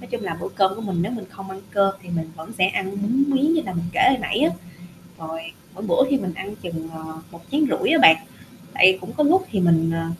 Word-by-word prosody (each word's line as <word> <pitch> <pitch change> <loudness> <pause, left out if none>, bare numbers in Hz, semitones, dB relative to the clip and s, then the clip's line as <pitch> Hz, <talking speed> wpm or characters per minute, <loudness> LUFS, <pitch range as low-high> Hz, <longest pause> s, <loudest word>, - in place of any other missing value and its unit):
Nói - - -12
chung 485 - -3
là - - -4
bữa 425 - -4
cơm 195 - +2
của 225 - -8
mình 190 -5 -2
nếu 205 +7 -3
mình 225 -5 -6
không 195 0 -10
ăn 190 0 -9
cơm 195 -1 +2
thì 180 - -15
mình 165 -2 -4
vẫn 160 +7 -10
sẽ 185 - +5
ăn 190 0 -2
bún 245 +7 +2
miến, 280 +3 +2
như 325 - +2
là 185 - -4
mình 170 0 -3
kể - - 0
hồi 260 - +3
nãy 245 - -2
á. - - +3 0.7
Rồi 160 0 -6 0.4
mỗi 195 - -9
bữa 260 +9 +3
thì 275 - +3
mình 185 -7 -4
ăn 200 +5 -7
chừng, 165 -4 -7
ờ, 160 0 -9 0.3
một 170 - -12
chén 295 +3 +1
rưỡi - - 0
á 325 - +4
bạn, 160 - +9 0.6
tại 185 - +7
vì 185 - -3
cũng 185 0 -10
có 300 - +1
lúc 365 +6 +3
thì 200 - 0
mình, 165 -2 +3
ờ, 165 0 -2
190 Hz, 275 wpm, -22 LUFS, 170-250 Hz, 0.7 s, bạn